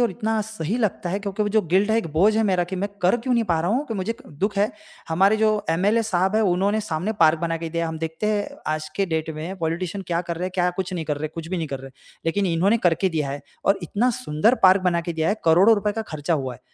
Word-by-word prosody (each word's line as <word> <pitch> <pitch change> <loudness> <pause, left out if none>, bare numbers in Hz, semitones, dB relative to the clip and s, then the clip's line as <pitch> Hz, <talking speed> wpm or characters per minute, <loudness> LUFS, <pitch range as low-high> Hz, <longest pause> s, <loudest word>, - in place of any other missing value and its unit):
और 240 - +3
इतना 220 -1 -1
सही 215 -1 -3
लगता 195 -5 -1
है 195 - -1
क्योंकि 200 +1 -2
वो 210 - 0
जो 215 0 +2
गिल्ट 190 +5 +2
है, 220 - +3
एक 195 - -2
बोझ 205 +7 +4
है 225 - +3
मेरा 185 -3 +2
कि 185 +2 -5
मैं 200 +3 -2
कर 185 +7 +4
क्यों 245 +1 -1
नहीं 235 - +2
पा 170 -5 +1
रहा 175 +4 0
हूँ 275 +6 0
कि 225 - -4
मुझे 195 +3 -2
क - - -15
दुःख 205 0 0
है, 210 +4 +2 0.4
हमारे 195 +6 +3
जो 215 -1 +1
एम 180 +4 +1
एल 225 +3 +4
ए - - +2
साहब 190 -1 0
हैं। 220 - +3
उन्होंने 200 +3 +2
सामने 190 +1 -2
पार्क 160 0 +5
बना 165 0 -1
के 165 0 -5
दिया। 170 0 -1
हम 160 -1 -5
देखते 160 +6 -3
हैं 210 -1 0 0.2
आज 155 0 -4
के 195 -1 +1
डेट 160 -1 -2
में 170 +5 -5
पॉलिटिशियन 170 +4 -2
क्या 170 0 0
कर 170 -1 -5
रहे 180 - -3
हैं, - - -4
क्या 180 -1 +2
कुछ 185 -1 -3
नहीं 165 -3 -3
कर 150 -2 -2
रहे 155 +1 -3
कुछ 165 0 -6
भी 185 - -2
नहीं 165 -2 -2
कर 135 -2 -5
रहे। 135 0 -10 0.4
लेकिन 195 +4 +1
इन्होंने 185 +6 +2
करके 175 +1 +2
दिया 150 -5 -2
है। 140 0 -5 0.2
और 195 0 +3
इतना 215 +9 +1
सुंदर 225 -2 +1
पार्क 190 +1 +7
बना 175 -2 +2
के 170 0 -4
दिया 160 0 0
है, 205 - +2
करोड़ों 180 +7 +6
रुपए 210 0 -1
का 225 - -3
खर्चा 155 -3 -2
हुआ 130 -4 -3
है। 125 - -16
185 Hz, 290 wpm, -23 LUFS, 165-210 Hz, 0.4 s, पार्क